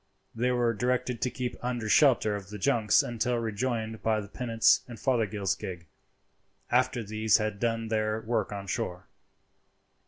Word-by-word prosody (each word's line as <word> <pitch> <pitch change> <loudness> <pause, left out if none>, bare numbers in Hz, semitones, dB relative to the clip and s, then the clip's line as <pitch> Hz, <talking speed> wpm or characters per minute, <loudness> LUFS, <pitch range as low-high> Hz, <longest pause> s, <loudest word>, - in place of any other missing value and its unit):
They 120 +2 0
were 120 -2 +2
directed 125 +2 -1
to 125 - +1
keep 125 -1 -4
under 120 -3 -2
shelter 115 -4 +4
of 100 -2 -7
the 105 - -7
junks 110 -1 +3
until 120 +1 -1
rejoined 110 0 -2
by 110 -1 +1
the 100 - -7
pinnace 115 +1 +2
and 120 -3 -9
Fothergill's 110 -6 0
gig, 85 -3 -7 0.9
after 125 -1 +2
these 110 +1 +2
had 105 -2 -3
done 115 -1 -1
their 110 0 0
work 110 0 -1
on 100 -1 -5
shore. 90 -1 -3
115 Hz, 155 wpm, -28 LUFS, 105-120 Hz, 0.9 s, shelter